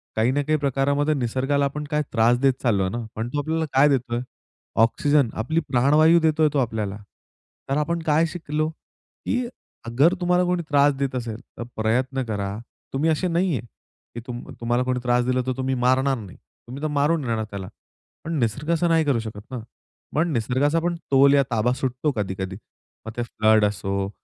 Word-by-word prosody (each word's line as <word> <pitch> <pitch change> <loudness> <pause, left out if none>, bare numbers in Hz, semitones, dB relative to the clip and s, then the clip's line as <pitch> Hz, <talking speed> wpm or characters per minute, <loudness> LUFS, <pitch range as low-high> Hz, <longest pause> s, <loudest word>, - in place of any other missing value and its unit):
काही 115 +3 +2
ना 145 +2 +1
काही 155 +2 +1
प्रकारामध्ये 140 +2 +1
निसर्गाला 135 +2 0
आपण 150 +2 -3
काय 150 0 +2
त्रास 120 +1 +4
देत 135 -1 +4
चाललोय 100 -6 +2
ना. 120 +1 -4
पण 110 +2 -3
तो 145 - -2
आपल्याला 160 +2 -1
काय 140 +3 +5
देतोय? 120 -3 0 0.6
ऑक्सिजन, 145 +2 +2
आपली 140 +9 0
प्राणवायू 150 +6 +5
देतोय 160 -1 +3
तो 145 - +2
आपल्याला. 110 -5 -2 0.7
तर 135 - +1
आपण 170 +3 0
काय 160 +1 +3
शिकलो? 155 -2 -2 0.6
की 250 0 0 0.4
अगर 135 +9 +3
तुम्हाला 180 0 +3
कोणी 180 -1 0
त्रास 145 -1 +4
देत 135 -1 -2
असेल, 115 -3 -4 0.2
तर - - -4
प्रयत्न 125 +4 0
करा, 100 -2 -3 0.4
तुम्ही 150 +4 +1
असे 160 +4 +1
नाहीये, 170 -6 0
की 120 0 -15
तुम 120 0 -6 0.2
तुम्हाला 120 +2 +1
कोणी 125 0 -1
त्रास 120 0 +2
दिला 130 0 +1
तर - - +1
तुम्ही 130 0 -1
मारणार 130 +2 +2
नाही. 100 -5 -10 0.3
तुम्ही 130 +4 -8
तर 155 - +1
मारून 150 +1 +1
राहणार 110 -2 -1
त्याला. 100 -2 -6 0.6
पण 165 - -4
निसर्ग 125 +6 -1
असं 170 +1 +2
नाही 165 -1 +3
करू 135 -5 +2
शकत 110 -2 -7
ना. 125 - -4 0.6
पण 165 +2 +2
निसर्गाचा 130 +7 +1
पण 170 +1 -1 0.2
तोल 140 +1 +6
या 140 - +5
ताबा 115 +2 +2
सुटतो 130 +3 -1
कधी-कधी. 95 -2 -3 0.5
मग 110 - -5
ते 120 - 0
फ्लड 110 -2 +3
असो 100 -1 -2
130 Hz, 180 wpm, -23 LUFS, 115-150 Hz, 0.7 s, तोल